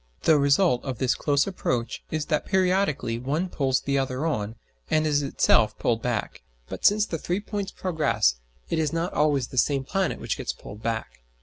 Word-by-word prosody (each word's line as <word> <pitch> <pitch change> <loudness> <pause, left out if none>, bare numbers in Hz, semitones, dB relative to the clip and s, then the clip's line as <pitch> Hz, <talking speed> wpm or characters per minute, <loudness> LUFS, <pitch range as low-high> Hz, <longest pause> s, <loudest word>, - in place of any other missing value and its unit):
The 155 -2 +5
result 140 -1 +3
of 130 -3 -4
this 130 +1 +2
close 145 -1 +1
approach 125 -11 -2
is 155 -1 -2
that 150 -2 -1
periodically 185 -11 +1
one 150 +9 -1
pulls 135 -5 0
the 140 0 0
other 135 +2 -2
on 110 -8 -2 0.3
and 155 0 +2
is 145 -1 +2
itself 110 -5 +3
pulled 115 -1 0
back; 120 -4 -3 0.3
but - - -7
since 210 +1 +5
the 165 -6 -4
three 180 +5 -1
points 205 -2 -4
progress, 155 - +1 0.3
it - - -1
is 155 -2 +1
not 165 +2 -2
always 145 -5 +1
the 130 - 0
same 140 +2 +2
planet 190 +5 -1
which - - -3
gets - - -3
pulled 105 +1 -11
back. 115 0 -3
145 Hz, 190 wpm, -25 LUFS, 125-170 Hz, 0.3 s, The